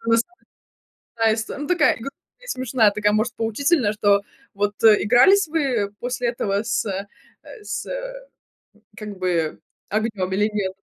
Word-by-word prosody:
Просто 230 +4 +1 0.9
такая 225 -1 +3
ист 220 0 -5
ну, 290 +1 -5
такая: 345 -5 +3
и - - -13
гру 275 - -4 0.3
и - - -16
смешная, 250 - +2
такая, 210 0 +1
может, 220 +2 0
поучительная, 230 +1 +1
что 205 -1 +3 0.3
вот 205 +1 -1
Игрались 245 - +5
вы 260 -10 0
после 245 0 -2
этого 205 -3 -1
с 225 0 -1
э, 195 0 -4 0.6
с - - -4 1.1
как 210 -2 -7
бы 170 -4 -1 0.3
огнем 210 -3 -2
или 210 +3 +2
нет? 190 -2 -2
220 Hz, 145 wpm, -22 LUFS, 205-250 Hz, 1.1 s, Игрались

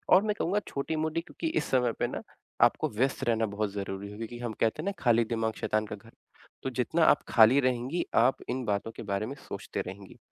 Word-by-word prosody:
और 190 - +6
मैं 210 -1 0
कहूँगा 200 +5 +1
छोटी-मोटी 155 +3 -1
क्योंकि 325 - -5
इस - - -3
समय 125 -2 +3
पे - - +1
ना - - -5 0.4
आपको - - +1
व्यस्त 130 +6 0
रहना 115 -1 +2
बहुत 105 0 -2
ज़रूरी 100 0 -5
है - - -9
क्योंकि 115 +1 -6
हम 120 -2 -3
कहते 115 +8 +1
हैं 200 - 0
न 200 - -3
खाली 120 -1 +4
दिमाग 110 -1 -1
शैतान 110 0 +1
का 105 - -5
घर। 115 +2 -17 0.5
तो - - -1
जितना - - +1
आप - - +5
खाली 115 +5 +7
रहेंगी 130 +5 0
आप 125 +3 +4
इन 130 +1 -1
बातों 105 +2 -1
के 115 - -9
बारे 100 +2 0
में 140 - -6
सोचते - - -4
रहेंगी। 95 +1 -9
115 Hz, 220 wpm, -29 LUFS, 110-140 Hz, 0.5 s, खाली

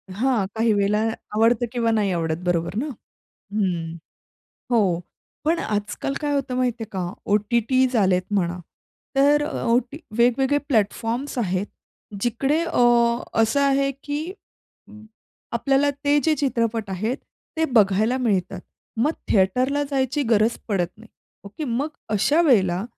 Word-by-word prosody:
हां, 240 -3 +1
काही 225 0 +2
वेळेला 205 +1 +2 0.4
आवडतं 230 +2 +3
किंवा 235 -2 +1
नाही 210 -3 +1
आवडत, 165 -2 -1
बरोबर 175 0 -1
ना? 240 +7 -1 0.7
हं, 175 -6 -1 0.8
हो. 195 -8 +2 0.4
पण 325 +3 +2
आजकाल 210 +6 -2
काय 290 -1 -1
होतं 275 -2 -1
माहितीये 245 -3 -1
का 185 -3 -2 0.2
ओ-टी-टीज 235 +4 +2
आले 190 -4 +4
आहेत 185 +3 -3
म्हणा. 180 -2 0 0.6
तर 290 +2 +4
अ, 300 - -4
ओटी 245 +4 +1 0.2
वेगवेगळे 265 +4 +3
प्लॅटफॉर्म्स 230 +3 0
आहेत, 190 -3 -1 0.5
जिकडे 270 +7 +1
अ, 335 - +1 0.6
असं 225 +5 +2
आहे 275 0 +2
की 290 +1 -2 0.7
अं, 215 0 -13 0.5
आपल्याला 275 +4 +2
ते 290 +1 +4
जे 320 -1 +3
चित्रपट 230 -6 -1
आहेत, 215 +7 -2 0.4
ते 320 - +2
बघायला 215 +2 +3
मिळतात. 200 -7 -1 0.4
मग 265 +8 +2 0.2
थिएटरला 250 +9 +2
जायची 270 +1 0
गरज 225 -2 +2
पडत 185 -5 0
नाही, 220 +1 -16 0.4
ओके? 200 +10 -6
मग 265 +3 -1 0.2
अशा 220 +10 +2
वेळेला 195 - +3
230 Hz, 135 wpm, -23 LUFS, 200-270 Hz, 0.8 s, आले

